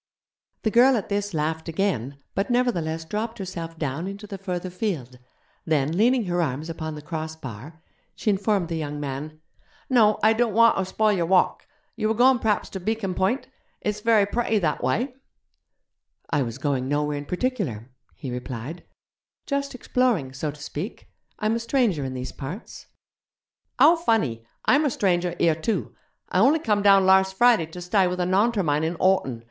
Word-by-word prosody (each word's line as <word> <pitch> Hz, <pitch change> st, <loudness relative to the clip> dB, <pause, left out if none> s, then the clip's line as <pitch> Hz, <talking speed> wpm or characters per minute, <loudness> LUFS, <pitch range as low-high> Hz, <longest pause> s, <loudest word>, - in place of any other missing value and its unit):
The 220 Hz, -, +1 dB
girl 250 Hz, +3 st, +6 dB
at 205 Hz, -, -4 dB
this 205 Hz, 0 st, -1 dB
laughed 160 Hz, 0 st, -2 dB
again, 155 Hz, -, -1 dB, 0.2 s
but 195 Hz, -, -1 dB
nevertheless 170 Hz, -11 st, 0 dB
dropped 220 Hz, +6 st, -3 dB
herself 170 Hz, -4 st, -6 dB
down 155 Hz, +3 st, -3 dB
into 200 Hz, +2 st, -7 dB
the 195 Hz, -1 st, -8 dB
further 180 Hz, -1 st, -4 dB
field; 160 Hz, -, -4 dB, 0.4 s
then, 155 Hz, 0 st, 0 dB
leaning 235 Hz, +3 st, +3 dB
her 175 Hz, -1 st, 0 dB
arms 155 Hz, +1 st, -2 dB
upon 160 Hz, -1 st, -5 dB
the 150 Hz, -, -9 dB
cross 160 Hz, 0 st, -5 dB
bar, 150 Hz, +3 st, -10 dB, 0.3 s
she 215 Hz, -, 0 dB
informed 195 Hz, -3 st, 0 dB
the 165 Hz, -, -2 dB
young 150 Hz, -1 st, -4 dB
man: 145 Hz, +2 st, -6 dB, 0.5 s
'No, 215 Hz, -4 st, +5 dB
I 220 Hz, +1 st, +6 dB
don't 225 Hz, -2 st, 0 dB
wanter 230 Hz, -4 st, +5 dB
spoil 215 Hz, +3 st, +1 dB
your 175 Hz, -4 st, 0 dB
walk. 185 Hz, 0 st, +2 dB, 0.3 s
You 220 Hz, -1 st, -1 dB
were 220 Hz, -, +1 dB
goin' 250 Hz, +2 st, +5 dB
p'raps 215 Hz, -3 st, 0 dB
ter 190 Hz, -, -5 dB
Beacon 205 Hz, 0 st, -2 dB
Point? 190 Hz, +11 st, 0 dB, 0.3 s
It's 210 Hz, 0 st, -2 dB
very 220 Hz, -2 st, +4 dB
pretty 225 Hz, +1 st, 0 dB
that 160 Hz, -7 st, 0 dB
wye.' 240 Hz, -, 0 dB, 1.2 s
'I 145 Hz, -3 st, +2 dB
was 115 Hz, -2 st, -3 dB
going 135 Hz, -2 st, -1 dB
nowhere 145 Hz, +1 st, 0 dB
in 145 Hz, -, -8 dB
particular,' 180 Hz, -, -3 dB, 0.2 s
he 130 Hz, -, -6 dB
replied; 125 Hz, +6 st, -6 dB, 0.6 s
'just 280 Hz, -1 st, -2 dB
exploring, 240 Hz, -, 0 dB
so 150 Hz, +3 st, -3 dB
to 145 Hz, 0 st, -9 dB
speak. 160 Hz, -, -6 dB, 0.3 s
I'm 215 Hz, +1 st, 0 dB
a -, -, -1 dB
stranger 230 Hz, -, +1 dB
in 130 Hz, -1 st, -4 dB
these 125 Hz, 0 st, -5 dB
parts.' 160 Hz, -, -8 dB, 0.9 s
'How 330 Hz, +3 st, +6 dB
funny! 215 Hz, -, 0 dB, 0.2 s
Imer 295 Hz, 0 st, +4 dB
stranger 180 Hz, -6 st, 0 dB
here 165 Hz, -, +3 dB
too. 170 Hz, +5 st, -2 dB, 0.3 s
I 180 Hz, -, 0 dB
only 270 Hz, +10 st, +5 dB
come 210 Hz, -9 st, 0 dB
down 195 Hz, -1 st, +6 dB
larse 190 Hz, 0 st, +5 dB
Friday 220 Hz, -4 st, +4 dB
to 180 Hz, +3 st, -9 dB
stye 185 Hz, +1 st, +2 dB
with 180 Hz, 0 st, -3 dB
a 180 Hz, -, +1 dB
Naunter 200 Hz, +3 st, +2 dB
mine 150 Hz, 0 st, +1 dB
in 165 Hz, +2 st, -1 dB
Horton. 170 Hz, -10 st, +1 dB
185 Hz, 175 wpm, -24 LUFS, 155-220 Hz, 1.2 s, girl